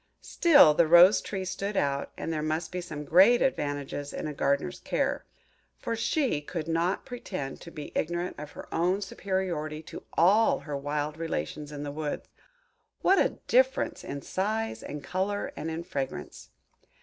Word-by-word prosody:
Still 290 - +6
the 165 +2 +3
Rose 175 +5 +8
tree 190 -2 -4
stood 195 +3 -3
out 140 0 0
that - - -3
there 155 -1 -1
must 155 +1 -2
be 180 - -3
some 155 -4 -6
great 195 +10 +6
advantages 145 - -2
in - - -4
a 150 - -3
Gardener's 140 - 0
care; - - -1 0.5
for 230 - -3
she 230 - 0
could 160 +1 -5
not 170 +3 0
pretend 190 - -6
to 170 - -9
be 150 -3 -8
ignorant 175 +1 -2
of 150 0 -8
her - - -9
own 180 +4 +1
superiority 180 -6 -3
to - - -9
all 205 +7 +4
her 150 -2 -5
wild 145 +2 -3
relations 150 - -4
in 145 -1 -6
the 145 - -4
woods. 150 0 -4 0.8
What 385 +1 +5
a - - +1
difference - - +2
in 140 0 -6
size, 220 +4 -2
in 150 - -6
colour, 190 +6 -2
and 160 - -4
in 160 +1 -4
fragrance! 140 -6 -5
165 Hz, 165 wpm, -28 LUFS, 150-195 Hz, 0.8 s, Rose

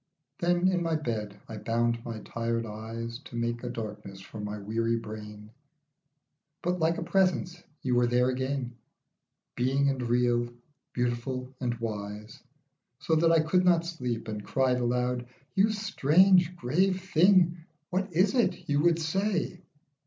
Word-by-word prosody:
Then 175 0 +2
in 180 -2 +1
my 165 -1 0
bed 110 -8 -3
I 110 - -7
bound 115 +1 0
my 115 -2 -6
tired 115 0 -2
eyes 115 +2 -6
To - - -10
make 120 0 -2
a 125 - -3
darkness 105 -4 -6
for 100 +3 -10
my 105 0 -4
weary 115 +3 -1
brain; 105 -1 -8 1.1
But 180 +1 0
like 165 +1 +2
a - - -3
presence 180 -1 +1 0.2
you 130 - 0
were 120 0 +4
there 125 +1 +3
again, 130 -1 -2 0.8
Being 135 +3 +2
and 135 -2 -1
real, 120 0 +2 0.4
beautiful 125 +1 -2
and 120 -2 -1
wise, 105 -2 -6 0.6
So 160 - -2
that 165 +1 +4
I 165 -1 +5
could 180 +4 +2
not 170 -2 +4
sleep, 125 -9 -4
and 105 -1 -4
cried 130 +2 +1
aloud, 125 0 0 0.3
"You 200 +2 +4
strange 185 -3 +4
grave 185 +7 +1
thing, 180 -1 +4 0.3
what 190 +2 -1
is 185 +6 +3
it 245 -3 +1
you 145 0 +2
would 170 0 +4
say 180 +2 -1
125 Hz, 150 wpm, -28 LUFS, 115-170 Hz, 1.1 s, I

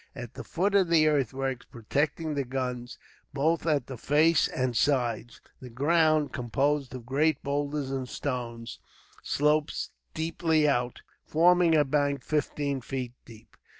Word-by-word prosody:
At 120 -1 -8
the - - -8
foot 195 +4 -1
of 195 -3 +4
the 160 -2 +4
earthworks 135 -3 -1
protecting 150 +7 -2
the 140 -1 -1
guns, 125 -1 -4 0.4
both 160 +3 +1
at 145 -5 +2
the 130 -3 -8
face 155 +4 +3
and 125 -1 -2
sides, 120 -4 0 0.2
the 125 - -10
ground, 155 +4 +2
composed 135 +2 -1
of 125 -2 -8
great 145 +3 +1
boulders 145 -1 -2
and 130 -2 -3
stones, 120 -4 -5 0.4
sloped 150 +1 +1
steeply 160 -1 -1
out, 125 -3 -1 0.2
forming 170 +1 +4
a 150 -1 +4
bank 140 -1 0
fifteen 145 -2 -1
feet 125 -1 -5
deep. 115 -1 -16
140 Hz, 140 wpm, -28 LUFS, 125-155 Hz, 0.4 s, of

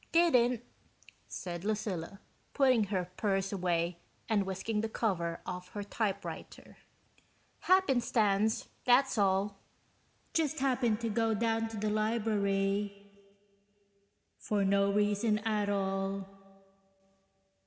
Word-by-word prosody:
"Didn't," 250 -8 +4 0.6
said 175 -1 -6
Lucilla, 200 -3 -3 0.3
putting 255 -6 +4
her 185 -3 -2
purse 195 -1 0
away 175 -2 0 0.3
and 205 -3 +1
whisking 210 +3 -2
the 220 - -2
cover 170 -7 -1
off 180 0 -6
her 205 - -4
typewriter. 205 -1 -4 0.8
"Happenstance, 230 - +2 0.2
that's 250 -1 +4
all." 195 0 +1 0.7
(Just 315 -1 +1
happened 250 -5 +1
to 230 - -1
go 225 +1 +1
down 225 +1 0
to 225 -1 -7
the 210 +1 -1
library... 205 -2 0 1.3
for 205 -2 0
no 200 +1 +3
reason 210 +1 +2
at 215 -1 -1
all 195 0 -1
210 Hz, 100 wpm, -32 LUFS, 195-225 Hz, 1.3 s, Didn't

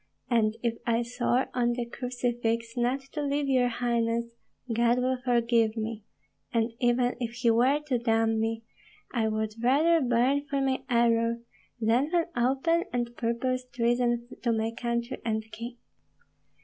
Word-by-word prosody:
And 220 -2 +2
if 230 -1 -1
I 235 0 +2
swore 245 +1 0
on 240 -1 +1
the 240 0 -2
crucifix 240 -2 -2
not 245 +3 0
to 300 - -3
leave 285 0 0
your 255 -2 +3
highness, 235 -1 0 0.4
God 235 +1 +3
will 255 0 0
forgive 235 -2 +2
me; 220 -1 -4 0.5
and 230 0 +1
even 245 0 +2
if 235 -2 -3
he 245 -1 +2
were 255 +6 +3
to 255 -5 0
damn 225 -1 +2
me, 225 0 -1 0.5
I 230 -3 +1
would 215 0 -1
rather 310 +7 +4
burn 260 +3 +2
for 280 0 -1
my 265 -1 0
error 235 -1 +2 0.4
than 235 +6 +2
for 340 -1 +1
open 275 +8 +2
and 240 -1 -2
purposed 250 +2 -2
treason 240 0 +1
to 235 - +1
my 225 0 0
country 235 +1 -3
and 220 -1 -1
king. 235 +3 -7
240 Hz, 150 wpm, -28 LUFS, 230-255 Hz, 0.5 s, rather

